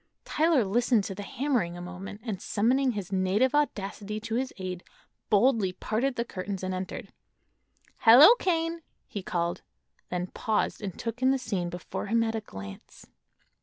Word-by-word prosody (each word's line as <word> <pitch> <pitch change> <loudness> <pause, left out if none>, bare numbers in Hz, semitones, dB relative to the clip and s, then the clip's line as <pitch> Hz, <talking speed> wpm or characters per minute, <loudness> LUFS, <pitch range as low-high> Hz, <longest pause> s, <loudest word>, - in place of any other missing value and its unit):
Tyler 310 -6 +3
listened 230 +2 +2
to 195 - -4
the 195 - -7
hammering 225 -6 -1
a - - -7
moment, 185 +4 -8
and 215 -6 -4
summoning 250 +5 +2
his 200 -3 -5
native 195 +7 +2
audacity 210 -7 -1
to 225 +1 -5
his 255 +3 -1
aid 185 -2 -5 0.5
boldly 210 -3 +3
parted 240 +7 -1
the 235 - -1
curtains 190 -2 -5
and 185 0 -2
entered. 185 0 -6 0.9
"Hello, 255 - +9
Kane!" 330 -2 0 0.2
he 205 - -6
called; 175 -2 -2 0.5
then 180 0 -2
paused 215 +4 -1
and 195 -4 -5
took 230 +1 -5
in 260 - +4
the 270 - +3
scene 195 -9 -2
before 175 +3 -5
him 230 +2 +2
at 225 0 -1
a 225 - -2
glance. 95 - -10
210 Hz, 165 wpm, -28 LUFS, 185-250 Hz, 0.9 s, Hello